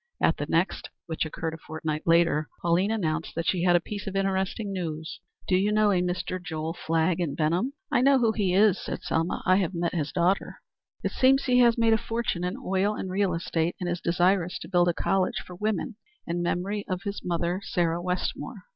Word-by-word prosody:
At - - +2
the - - -3
next, - - 0 0.2
which 160 -2 -2
occurred 160 +1 -4
a 160 - -8
fortnight 155 0 -4
later, 165 -2 +3
Pauline 175 +4 +2
announced 165 -7 -2
that 165 0 -2
she 180 0 +1
had 175 0 +4
a - - +6
piece 205 +3 -7
of 195 - -4
interesting 195 +2 -1
news. 160 -4 -4 0.3
"Do 185 - +3
you 200 +3 +2
know 210 -1 +4
a 180 -2 +2
Mr. 180 +1 -2
Joel 160 -1 -3
Flagg 165 +1 0
in 165 -6 -1
Benham?" 170 - 0 0.2
"I - - +3
know 275 +1 +5
who 230 -3 +3
he 205 -4 0
is," 205 -1 +5
said - - -5
Selma. 165 +2 -1
"I 185 0 +5
have 185 -2 -1
met 170 0 -1
his 150 -4 -2
daughter." 185 +2 +1 0.5
"It - - -1
seems 270 +1 +4
he 250 -1 +3
has 235 -1 +5
made 230 -1 +4
a 220 - +3
fortune 225 -7 -2
in 180 +1 -2
oil 195 +3 0
and 190 -3 -5
real 190 -2 +1
estate, 165 0 -1
and 180 - -3
is 175 0 -2
desirous 180 +1 +2
to - - -7
build 175 -2 +3
a 175 - +3
college 190 -1 +1
for 180 - -10
women 210 +2 -2 0.3
in 175 +1 -2
memory 195 +4 -1
of 185 0 -2
his 200 0 -4
mother, 175 +2 -1
Sarah 170 -2 0
Wetmore. 180 +1 -3
180 Hz, 215 wpm, -27 LUFS, 170-200 Hz, 0.5 s, a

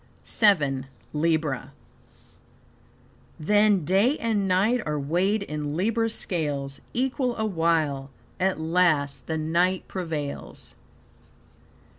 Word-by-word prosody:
VII. 145 - +2 0.3
Libra 155 -3 0 1.7
"Then 205 0 +3
day 205 - +3
and 215 -4 0
night 205 +7 +2
are 150 -1 -2
weighed 185 +9 +1
in 150 -4 -4
Libra's 225 +4 0
scales; 145 -5 -2
Equal 255 0 -1
awhile, 165 -9 0 0.3
at 185 -2 +1
last 160 -4 +1
the 160 - -1
night 170 +4 +1
prevails." 160 -6 -5
170 Hz, 90 wpm, -25 LUFS, 150-205 Hz, 1.7 s, Then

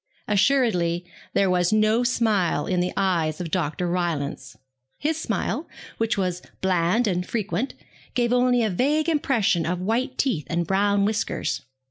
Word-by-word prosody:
Assuredly 195 -7 +2 0.3
there 200 - +3
was 180 0 +2
no 215 +2 +3
smile 215 -11 +1
in 180 -1 0
the 180 +1 0
eyes 170 -5 +1
of 170 -3 -5
Dr. 175 0 -1
Rylance. 155 -7 -2 0.4
His 315 +1 -1
smile, - - -2 0.3
which 225 -1 +1
was 180 -2 -1 0.2
bland 185 +5 +2
and 180 -3 0
frequent, 220 +5 -2 0.4
gave 240 -1 +2
only 245 -1 +3
a 215 - +1
vague 295 - +1
impression 240 - +2
of 175 +2 -1
white 240 +7 -1
teeth 185 - 0
and 170 0 0
brown 200 +2 +2
whiskers. 210 0 -1
195 Hz, 145 wpm, -24 LUFS, 175-240 Hz, 0.4 s, there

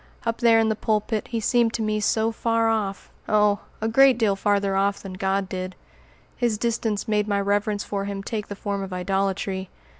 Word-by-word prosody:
Up 230 0 -1
there 230 -2 +5
in 225 0 +3
the 220 - +1
pulpit 215 0 -1
he 230 -2 -2
seemed 230 +1 +2
to 225 - -1
me 215 0 0
so 220 +2 +1
far 230 0 +1
off 205 -3 -2 0.2
oh! 210 -1 +3 0.2
a 220 - 0
great 265 +2 +5
deal 215 -4 +2
farther 200 -1 +1
off 200 +1 +1
than 195 -2 -8
God 190 +1 -1
did. 185 0 -5 0.6
His 235 -3 0
distance 225 -1 -1
made 210 -1 +1
my 200 -1 +1
reverence 205 +1 0
for 200 -1 -3
him 200 -1 -4
take 215 -1 -4
the 205 - -6
form 200 0 -3
of 195 -1 -6
idolatry. 190 0 -1
210 Hz, 200 wpm, -24 LUFS, 195-225 Hz, 0.6 s, there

